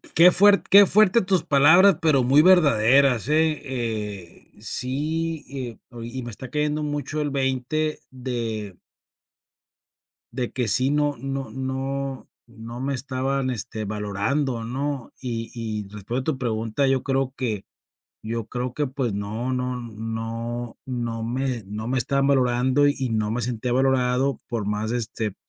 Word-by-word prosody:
qué 175 +2 +8
fuer 200 +2 +6
qué 200 0 +7
fuerte 215 +3 +5
tus 185 -2 +1
palabras, 155 +7 +6
pero 155 -6 +3
muy 135 +4 +5
verdaderas, 140 - +5
eh 155 0 +2
eh, 105 -8 -5
sí, 155 +5 -2
eh, 130 -4 -6
oye, 120 -1 -8
y 130 - -4
me 120 - -6
está 125 +4 -8
cayendo 150 +1 -1
mucho 145 0 -3
el 150 - 0
veinte 135 +3 -1
de 115 -6 -4 1.6
de 125 -1 -3
que 125 -3 -2
sí, 130 +5 +2
no 145 -1 +1
no 135 +1 -4
no 135 +1 -4 0.2
no 115 +1 -9
me 140 +1 -1
estaban, 130 +1 -1
este, 110 -2 -4
valorando, 110 +5 -2
¿no?, 135 +2 -4
y 115 -3 -4
y 110 -2 -4
respondiendo 120 +8 -3
tu 130 - -7
pregunta, 115 +2 -1
yo 135 -1 +2
creo 135 -1 -1
que 110 -6 -2 0.6
yo 115 0 -4
creo 125 0 -4
que, 145 +1 -1
pues, 130 -4 -2
no 110 +5 -3
no 125 0 -2
no 115 +1 -5
no 120 -3 -3
me 125 -1 -2
no 105 +2 -5
me 130 +1 0
estaban 135 +2 +1
valorando 130 +1 +3
y 135 -4 -1
no 110 -1 0
me 120 +1 -1
sentía 120 +1 -2
valorado 130 0 +2
por 115 -3 -2
más, 105 +1 -2
este, 110 -3 -3
130 Hz, 150 wpm, -24 LUFS, 115-140 Hz, 1.6 s, qué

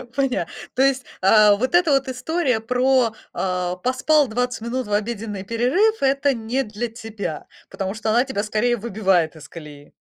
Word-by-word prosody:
Поня 265 -11 0 0.3
То 260 - 0
есть, 270 -1 +2 0.2
а, 210 +1 +6
вот 255 +10 -1
эта 350 -4 +4
вот 275 0 +2
история 260 -1 -1
про, 250 0 +2 0.2
а, 180 -1 -2
поспал 260 +7 +2
20 245 0 -2
минут 240 +1 -3
в 205 - -4
обеденный 210 -2 -3
перерыв- 265 - +1
это 275 +1 +2
не 240 +4 -2
для 215 +3 -4
тебя, 220 -8 -6 0.2
потому 195 0 -4
что 220 0 -3
она 240 +3 +4
тебя 240 -7 -3
скорее 225 +3 0
выбивает 190 -7 0
из 150 -2 -13
колеи. 150 -3 -12
230 Hz, 165 wpm, -22 LUFS, 205-260 Hz, 0.3 s, а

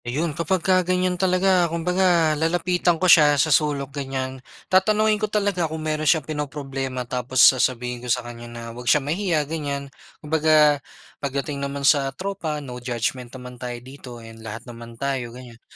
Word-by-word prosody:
Ayun, 150 +6 -2
kapagka 185 +3 +1
ganiyan 180 0 0
talaga 185 -1 +2
kumbaga 170 -1 +2
lalapitan 175 +2 +1
ko 185 - -1
siya 150 -4 +6
sa 155 +2 +3
sulok 140 -2 0
ganiyan, 130 -1 -4 0.2
tatanungin 215 +3 +2
ko 215 - 0
talaga 200 -6 0
kung 160 - -5
mayro'n 155 -1 0
siyang 160 -3 +3
pinoproblema 135 -4 -4
tapos 125 +1 -4 0.2
sasabihin 125 -1 -1
ko 125 - -7
sa 125 0 +1
kanya 120 0 -9
na, 120 0 -9
'wag 120 0 -4
siya - - +6
mahiya, 155 +2 -1
ganiyan. 140 -2 -4 0.2
Kumbaga 150 -1 +3 0.4
pagdating 140 +1 -3
naman 140 0 -3
sa 140 -1 +4
tropa, 185 -6 -3
no 125 -1 -8
judgment 125 +1 -3
naman 125 -1 -11
tayo 125 -1 -4
dito, 125 0 -11
and 115 -1 -12
lahat 110 0 -8
naman 115 -1 -11
tayo, 135 -2 -2
ganiyan. 120 -2 -13
145 Hz, 165 wpm, -23 LUFS, 125-170 Hz, 0.4 s, siya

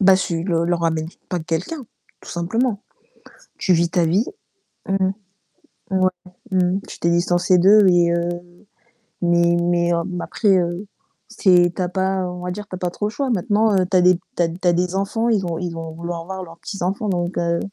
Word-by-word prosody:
Bah, 190 -1 +7
tu 170 -3 -2
leur 170 -3 +1
leur 175 0 0
ramènes 160 -1 0 0.2
pas 180 - -1
de - - -10
quelqu'un, 185 - -3 0.4
tout - - -14
simplement. 205 +6 -1 0.8
Tu 190 - +2
vis 170 0 +3
ta 175 -2 +2
vie 185 +8 +2 0.6
mmh 195 - +1
mh. 190 - +1 0.8
Ouais, 185 0 +3 0.4
mmh, 190 - +1 0.2
mh. - - -2
Tu - - -9
t'es 170 - +1
distancée 175 +1 +3
d'eux 200 +3 +6
et 175 -1 +4
heu, 170 0 0 0.9
mais 170 0 +3
mais, 175 0 +1
heu, - - +2 0.2
après, 195 +1 +2
heu, 175 +3 -2 0.4
c'est 180 -5 +4
tu - - -4
as 180 - 0
pas, 190 0 -1
on 180 0 -7
va 180 - -3
dire, 210 +2 -6
tu 185 - -6
as - - -6
pas 180 -1 -2
trop 205 - -4
le - - -4
choix. 275 +2 -2
Maintenant, 215 +1 +2
heu, 185 - +2
tu 190 - 0
as 180 - +5
des 180 0 +6 0.2
tu 175 - +2
as 165 - +1
tu 175 +2 -3
as 175 - +5
des 180 +2 0
enfants, 225 +4 0
ils 200 -5 +1
ont 165 -1 -2
ils 175 -1 -3
vont 165 -1 -6
vouloir 170 +1 -5
avoir 190 +2 -6
leurs 165 -1 -12
petits-enfants, 195 +3 -3
donc 175 -1 -2
heu 170 0 +1
180 Hz, 215 wpm, -21 LUFS, 170-190 Hz, 0.9 s, Bah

